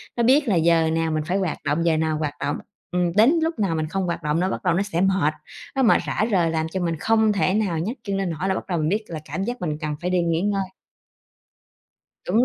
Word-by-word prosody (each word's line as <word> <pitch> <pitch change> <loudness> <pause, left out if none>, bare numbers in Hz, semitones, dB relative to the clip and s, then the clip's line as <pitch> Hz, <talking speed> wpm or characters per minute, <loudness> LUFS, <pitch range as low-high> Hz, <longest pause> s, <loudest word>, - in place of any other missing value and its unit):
nó 235 - +1
biết 275 +4 +4
là 200 - +2
giờ 165 -1 +3
nào 165 0 0
mình 155 -1 -1
phải 185 +2 +1
hoạt 185 -4 -1
động, 160 +4 0
giờ 165 -2 +3
nào 155 -1 0
hoạt 150 -2 -2
động, 145 - -1 0.3
ừm, 180 -1 +1
đến 280 +10 +5
lúc 325 -6 -2
nào 190 -5 +1
mình 155 -1 -1
không 190 +4 -2
hoạt 170 -1 -3
động 150 +2 0
nó 185 +1 +1
bắt - - -4
đầu 180 -3 +2
nó 190 - +1
sẽ 180 -3 -2
mệt, 190 -6 +2 0.4
nó 265 - +2
mệt 225 - +5
rã 215 - 0
rời 170 -4 +2
làm 160 0 -1
cho 190 - -2
mình 170 -2 -1
không 220 -1 +3
thể 195 -1 +1
nào 195 -7 0
nhấc 220 +11 -3
chân 200 -2 -2
lên 195 -2 -1
nổi 165 +3 -3
là 190 - +1
bắt - - -5
đầu 175 -3 -1
mình 155 +1 0
biết 215 +3 0
là 165 -2 -5
cảm 160 +7 -3
giác 240 -1 -4
mình 155 -3 -2
cần 150 -1 -3
phải 180 - -1
đi 180 -1 +2
nghỉ 165 0 0
ngơi. 200 0 0 1.7
Đúng 220 +7 +4
175 Hz, 270 wpm, -23 LUFS, 160-200 Hz, 1.7 s, đến